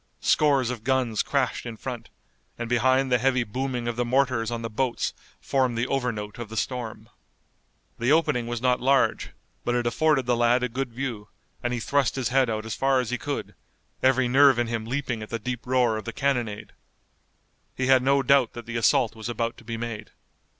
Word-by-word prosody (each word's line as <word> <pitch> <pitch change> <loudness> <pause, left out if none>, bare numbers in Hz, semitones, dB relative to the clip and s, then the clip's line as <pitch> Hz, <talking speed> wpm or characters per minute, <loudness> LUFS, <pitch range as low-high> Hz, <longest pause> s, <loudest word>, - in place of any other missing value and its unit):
Scores 140 -5 +3
of 115 -3 -6
guns 125 -3 +1
crashed 135 -3 -1
in 115 -2 -7
front, 125 -1 -6 0.5
and 120 - -4
behind 130 +2 +2
the 125 - +4
heavy 130 0 +2
booming 125 +2 -3
of 120 -1 -3
the 120 - +1
mortars 125 -2 +1
on 115 -1 -4
the - - -2
boats 125 +2 -1 0.3
formed 130 -3 0
the 120 - +1
overnote 120 -6 -3
of 120 -3 -6
the 110 - -7
storm. 110 -1 -4 0.9
The 120 +4 +1
opening 145 -7 +2
was 120 0 -4
not 125 -1 +2
large, 135 +2 +2 0.3
but 120 - 0
it 120 -1 0
afforded 135 +2 +2
the 120 0 +2
lad 120 +1 +3
a 125 - 0
good 125 +1 -3
view, 115 -4 -5 0.3
and 120 - -1
he 120 - -1
thrust 135 +3 +1
his 130 -2 -1
head 130 -1 +3
out 110 -1 -3
as 110 - -4
far 135 +2 +2
as 125 -2 -2
he 125 - -2
could, 145 +3 -4 0.5
every 130 -1 +3
nerve 135 0 +6
in 120 - +1
him 115 -1 -3
leaping 125 -2 -3
at 110 - -7
the 115 - -2
deep 120 +2 -5
roar 125 -3 +2
of 110 - -7
the - - -5
cannonade. 120 -7 -2 1.0
He 130 - -1
had 130 -1 +5
no 135 +1 +3
doubt 135 -2 +3
that 120 -1 -8
the 115 0 -4
assault 120 -1 +3
was 110 +1 -6
about 115 0 -2
to - - -14
be 115 -1 -5
made. 115 -2 -5
125 Hz, 205 wpm, -25 LUFS, 115-130 Hz, 1.0 s, nerve